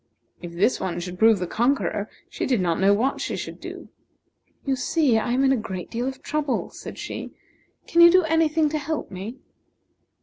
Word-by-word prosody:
If 175 -1 -8
this 190 +9 +2
one 175 -2 -3
should 180 +1 -6
prove 225 -1 +6
the 180 - -2
conqueror, 235 0 0 0.2
she 420 +3 -4
did 250 -4 +2
not 170 -3 0
know 195 +1 +4
what 240 +7 +1
she - - -2
should - - -6
do. - - -9 0.8
"You 270 -1 +1
see, 260 -2 +2
I 240 - -2
am 260 +2 +2
in 270 - +4
a - - +4
great 190 -5 -6
deal 240 +2 -2
of 265 0 -6
trouble," 300 -3 -2
said - - -9
she. - - -6 0.6
"Can 340 - +3
you 340 - +10
do 370 +1 +5
any 325 0 +3
thing 310 0 +2
to 305 +1 -2
help 300 -3 -4
me?" 200 +7 -7
250 Hz, 205 wpm, -24 LUFS, 195-300 Hz, 0.8 s, you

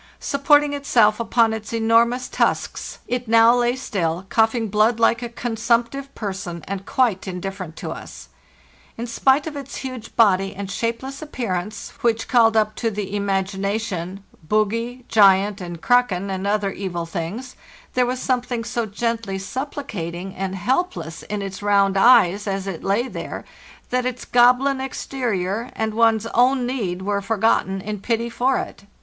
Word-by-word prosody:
Supporting 290 +1 +3
itself 235 -7 +3
upon 230 -1 +2
its 220 -1 -6
enormous 230 +2 +2
tusks, - - -1
it 245 -1 -2
now 230 +1 +6
lay 240 0 +2
still, 180 -8 -2
coughing 225 0 +2
blood 215 +3 +2
like 230 +1 +3
a 240 - -4
consumptive 235 +3 -1
person, 190 -5 -5
and 195 0 -5
quite 245 -9 +1
indifferent 185 -2 -5
to - - -6
us. - - -9 0.7
In 235 - -4
spite 265 +4 +2
of 315 -2 -5
its 280 -1 -7
huge 255 -4 -7
body 195 -3 +3
and 200 0 -5
shapeless 235 +6 -3
appearance, 210 - -4
which 230 -1 +1
called 225 -2 +4
up 215 0 +2
to 230 - 0
the 205 -1 -4
imagination 195 -1 -2 0.2
bogy, 230 +7 -1
giant, 200 -1 +4
and 175 -2 -6
kraken, 205 -6 +2
and 190 +1 -3
other 205 -1 +1
evil 180 -3 -4
things, 190 +9 -5 0.4
there 250 -1 +2
was 250 +1 -2
something 245 -2 -1
so 235 -1 -2
gently 225 -1 -2
supplicating 195 - -5
and 190 0 -4
helpless 230 - -2
in 205 -1 -4
its 195 0 -6
round 200 -1 +3
eyes 205 -2 +5
as 195 -1 -2
it 190 -4 -5
lay 205 +6 +1
there - - -6 0.5
that 250 0 +1
its 250 -1 -5
goblin 250 +3 +4
exterior 235 -5 -3
and 220 -1 -1
one's 225 -1 +3
own 250 +1 +3
need 200 -8 -3
were 200 0 -1
forgot 225 +1 +2
ten 195 0 -3
in 210 +1 -5
pity 235 +2 -1
for 255 +3 +1
it. 200 - -6
220 Hz, 155 wpm, -22 LUFS, 195-245 Hz, 0.7 s, now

